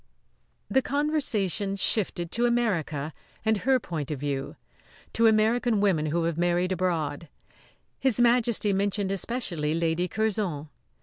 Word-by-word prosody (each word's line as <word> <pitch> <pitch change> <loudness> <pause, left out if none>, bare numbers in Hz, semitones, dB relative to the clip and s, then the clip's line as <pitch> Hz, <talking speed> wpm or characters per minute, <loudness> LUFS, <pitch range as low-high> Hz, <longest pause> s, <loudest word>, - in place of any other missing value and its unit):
The 265 - +2
conversation 255 - 0
shifted 185 -4 0
to 240 +1 +2
America 165 -11 -1 0.3
and 220 0 +3
her 260 +6 +2
point 160 - -5
of 150 -3 -4
view; 140 +1 -3 0.6
to 230 0 +4
American 220 +1 +2
women 180 -7 +2
who 165 +3 0
have 165 0 -1
married 175 +1 +1
abroad. 165 -4 -2 0.7
His 260 -3 +1
Majesty 235 -3 +3
mentioned 200 0 0
especially 180 -8 -2
Lady 165 +1 0
Curzon. 195 -7 -2
195 Hz, 125 wpm, -26 LUFS, 165-225 Hz, 0.7 s, to